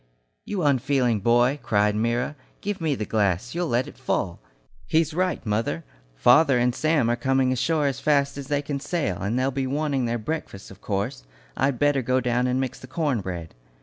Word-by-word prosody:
"You 195 Hz, -4 st, -2 dB
unfeeling 130 Hz, -4 st, +2 dB
boy!" 120 Hz, +6 st, +3 dB
cried 105 Hz, 0 st, +2 dB
Myra, 120 Hz, +6 st, 0 dB, 0.3 s
"give 205 Hz, -3 st, -3 dB
me 155 Hz, -3 st, +1 dB
the 110 Hz, -, -3 dB
glass 105 Hz, +1 st, 0 dB
you'll 175 Hz, 0 st, -1 dB
let 125 Hz, -1 st, +1 dB
it -, -, -12 dB
fall. -, -, -1 dB, 0.5 s
He's 160 Hz, -1 st, +2 dB
right, 180 Hz, -4 st, -1 dB
mother, 105 Hz, -7 st, -1 dB, 0.3 s
father 135 Hz, -, +5 dB
and 120 Hz, 0 st, +2 dB
Sam 155 Hz, -3 st, +2 dB
are 120 Hz, -, +2 dB
coming 130 Hz, +1 st, +1 dB
ashore 150 Hz, +4 st, +1 dB
as 140 Hz, -3 st, -1 dB
fast 140 Hz, -2 st, +2 dB
as 140 Hz, -1 st, -7 dB
they 145 Hz, 0 st, 0 dB
can 145 Hz, -1 st, -3 dB
sail, 145 Hz, -, -2 dB
and 105 Hz, +5 st, -1 dB
they'll 130 Hz, +1 st, +1 dB
be 135 Hz, 0 st, -2 dB
wanting 140 Hz, -2 st, 0 dB
their 120 Hz, 0 st, -1 dB
breakfasts, 110 Hz, -6 st, -5 dB
of 95 Hz, -, -14 dB
course. 100 Hz, -, -3 dB, 0.3 s
I'd 135 Hz, -1 st, +1 dB
better 145 Hz, -1 st, +2 dB
go 130 Hz, +1 st, +1 dB
down 125 Hz, 0 st, +1 dB
and 125 Hz, +1 st, 0 dB
mix 130 Hz, -2 st, -3 dB
the 130 Hz, -, -11 dB
corn 140 Hz, -4 st, -1 dB
bread." 85 Hz, -4 st, -6 dB
130 Hz, 195 wpm, -25 LUFS, 115-145 Hz, 0.5 s, father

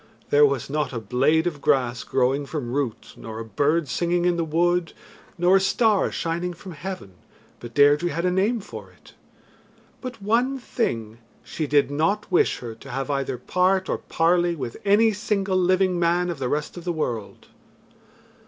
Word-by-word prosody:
There 145 Hz, 0 st, +6 dB
was 140 Hz, -4 st, -2 dB
not 150 Hz, -2 st, -2 dB
a 115 Hz, -, -2 dB
blade 135 Hz, -, +2 dB
of 155 Hz, -5 st, -3 dB
grass 125 Hz, -4 st, +1 dB
growing 135 Hz, +2 st, 0 dB
from 130 Hz, -6 st, -4 dB
root, 135 Hz, -5 st, -3 dB
nor 110 Hz, -1 st, -8 dB
a 115 Hz, -, -5 dB
bird 145 Hz, +8 st, +1 dB
singing 175 Hz, +6 st, 0 dB
in 175 Hz, -1 st, +3 dB
the 170 Hz, -, 0 dB
wood, 170 Hz, +1 st, +1 dB, 0.4 s
nor 180 Hz, +2 st, +5 dB
a -, -, +1 dB
star 210 Hz, +1 st, +2 dB
shining 170 Hz, +2 st, -2 dB
from 185 Hz, +2 st, -10 dB
heaven 170 Hz, -, -7 dB, 0.5 s
but 120 Hz, -1 st, -10 dB
Deirdre 145 Hz, +4 st, +5 dB
had 170 Hz, +1 st, -2 dB
a 180 Hz, -, +2 dB
name 205 Hz, +5 st, +1 dB
for 195 Hz, -, -10 dB
it. -, -, -20 dB, 0.9 s
But 255 Hz, -3 st, -7 dB
one 235 Hz, +7 st, +1 dB
thing, 115 Hz, -, -3 dB, 0.2 s
she 155 Hz, -, -4 dB
did 145 Hz, 0 st, +3 dB
not 195 Hz, +9 st, 0 dB
wish 180 Hz, -, +3 dB
her 120 Hz, -2 st, -6 dB
to 110 Hz, -, -14 dB
have 135 Hz, +1 st, -3 dB
either 135 Hz, -2 st, -2 dB
part 185 Hz, +6 st, +1 dB
or -, -, -1 dB
parley 175 Hz, +1 st, +1 dB
with 125 Hz, -6 st, -5 dB
any 210 Hz, +2 st, +4 dB
single 195 Hz, -1 st, -1 dB
living 185 Hz, 0 st, +2 dB
man 175 Hz, +1 st, +1 dB
of 165 Hz, -, -7 dB
the 130 Hz, -2 st, -2 dB
rest 150 Hz, +5 st, -2 dB
of 175 Hz, -, -7 dB
the 175 Hz, -, -1 dB
world. 120 Hz, -10 st, -4 dB
165 Hz, 180 wpm, -24 LUFS, 135-185 Hz, 0.9 s, There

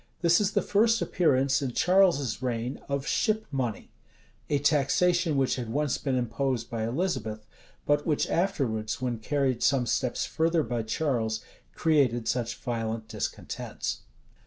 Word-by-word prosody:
This 170 Hz, +2 st, +4 dB
is 200 Hz, -1 st, 0 dB
the -, -, +2 dB
first 230 Hz, +3 st, +3 dB
appearance, 140 Hz, -5 st, +2 dB
in 130 Hz, -3 st, -2 dB
Charles's 170 Hz, -, +3 dB
reign, 125 Hz, 0 st, -3 dB
of 140 Hz, 0 st, -1 dB
ship 220 Hz, +4 st, +1 dB
money; 125 Hz, -6 st, -3 dB, 0.6 s
a 145 Hz, -, +2 dB
taxation 155 Hz, +3 st, +2 dB
which 135 Hz, -1 st, +1 dB
had 120 Hz, -3 st, -4 dB
once 145 Hz, +2 st, 0 dB
been 135 Hz, -3 st, -1 dB
imposed 120 Hz, 0 st, -1 dB
by 115 Hz, -2 st, -2 dB
Elizabeth, 115 Hz, -, -2 dB, 0.4 s
but 145 Hz, 0 st, +2 dB
which 150 Hz, -2 st, 0 dB
afterwards, 120 Hz, -, -1 dB
when 125 Hz, -3 st, -2 dB
carried 135 Hz, 0 st, 0 dB
some 135 Hz, -3 st, +3 dB
steps 125 Hz, +1 st, 0 dB
further 165 Hz, 0 st, +1 dB
by 120 Hz, -4 st, -2 dB
Charles, 110 Hz, -2 st, -1 dB, 0.3 s
created 130 Hz, -8 st, +2 dB
such 120 Hz, 0 st, -1 dB
violent 115 Hz, -2 st, -3 dB
discontents. -, -, -4 dB
135 Hz, 140 wpm, -28 LUFS, 115-160 Hz, 0.6 s, This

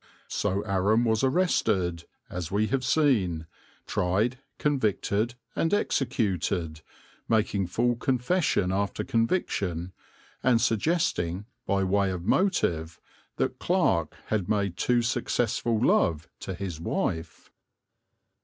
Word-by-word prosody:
So 100 Hz, +2 st, -1 dB
Aram 100 Hz, +4 st, +2 dB
was 110 Hz, 0 st, +1 dB
arrested, 110 Hz, -, +1 dB, 0.2 s
as 90 Hz, -2 st, -5 dB
we 105 Hz, +3 st, +1 dB
have 135 Hz, -1 st, 0 dB
seen, 115 Hz, -, +2 dB, 0.4 s
tried, 105 Hz, +9 st, 0 dB, 0.2 s
convicted 115 Hz, -4 st, 0 dB, 0.2 s
and 165 Hz, -, +1 dB
executed, 95 Hz, -, -1 dB, 0.5 s
making 105 Hz, -4 st, +1 dB
full 120 Hz, +6 st, +1 dB
confession 125 Hz, -, +1 dB
after 100 Hz, +1 st, -1 dB
conviction, 95 Hz, -, -1 dB, 0.5 s
and 125 Hz, -3 st, +4 dB
suggesting, 105 Hz, -, 0 dB, 0.2 s
by 95 Hz, 0 st, +2 dB
way 100 Hz, +1 st, +2 dB
of 90 Hz, -2 st, -4 dB
motive, 85 Hz, -, +1 dB, 0.4 s
that -, -, -1 dB
Clarke -, -, +1 dB
had 105 Hz, -5 st, -1 dB
made 100 Hz, -4 st, 0 dB
too 120 Hz, +5 st, +2 dB
successful 115 Hz, -1 st, 0 dB
love 85 Hz, -8 st, +2 dB
to 95 Hz, -, -5 dB
his 90 Hz, -4 st, -5 dB
wife. 80 Hz, 0 st, -3 dB
100 Hz, 105 wpm, -27 LUFS, 90-120 Hz, 0.5 s, and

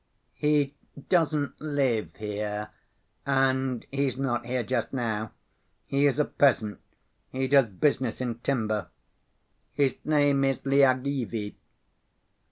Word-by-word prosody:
"He 150 Hz, -2 st, +1 dB, 0.4 s
doesn't 155 Hz, -5 st, +1 dB
live 130 Hz, -, 0 dB
here, 105 Hz, 0 st, -4 dB, 0.5 s
and 135 Hz, -2 st, +1 dB
he's 135 Hz, -1 st, 0 dB
not 120 Hz, -3 st, -1 dB
here 125 Hz, 0 st, -1 dB
just 120 Hz, +1 st, -2 dB
now. 110 Hz, -4 st, -2 dB, 0.5 s
He 140 Hz, +1 st, +2 dB
is 140 Hz, -, +1 dB
a 150 Hz, -, +3 dB
peasant, 110 Hz, -8 st, +2 dB, 0.5 s
he 130 Hz, 0 st, -1 dB
does 135 Hz, -2 st, +5 dB
business 120 Hz, +3 st, 0 dB
in 120 Hz, -2 st, -3 dB
timber. 110 Hz, -5 st, -1 dB, 0.9 s
His 140 Hz, -2 st, +1 dB
name 145 Hz, -2 st, +3 dB
is 135 Hz, -1 st, +2 dB
Lyagavy. 130 Hz, -5 st, +1 dB
130 Hz, 110 wpm, -27 LUFS, 115-140 Hz, 0.9 s, does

